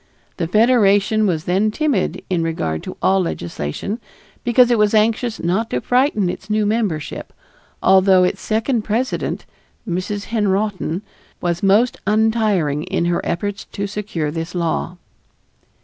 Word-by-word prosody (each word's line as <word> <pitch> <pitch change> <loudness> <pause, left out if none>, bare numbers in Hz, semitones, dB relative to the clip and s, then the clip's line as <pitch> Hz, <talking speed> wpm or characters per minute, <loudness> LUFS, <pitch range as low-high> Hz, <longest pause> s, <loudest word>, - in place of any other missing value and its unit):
The 170 - -1
Federation 215 0 +3
was 160 -4 -1
then 190 +5 +1
timid 300 +6 -1
in 180 -4 0
regard 85 - -2
to - - -8
all 195 0 +4
legislation 85 - -4 0.4
because 245 +1 +4
it 235 - +3
was 210 +1 +3
anxious 225 +2 +1
not 190 +7 0
to 125 - -1
frighten 245 - +2
its 190 +3 -5
new 215 0 +1
membership, 205 -8 -2 0.5
although 190 -1 +5
its 185 +2 0
second 225 +2 0
president, 230 +5 -2 0.4
Mrs. 185 +3 -3
Henrotin, 200 -3 0 0.4
was 175 0 -1
most 205 +5 +3
untiring 210 -9 +2
in 170 - -1
her 175 0 0
efforts 205 +3 -3
to 200 - -2
secure 200 -7 -3
this 165 +2 -5
law. 170 +1 -2
200 Hz, 135 wpm, -19 LUFS, 175-220 Hz, 0.5 s, although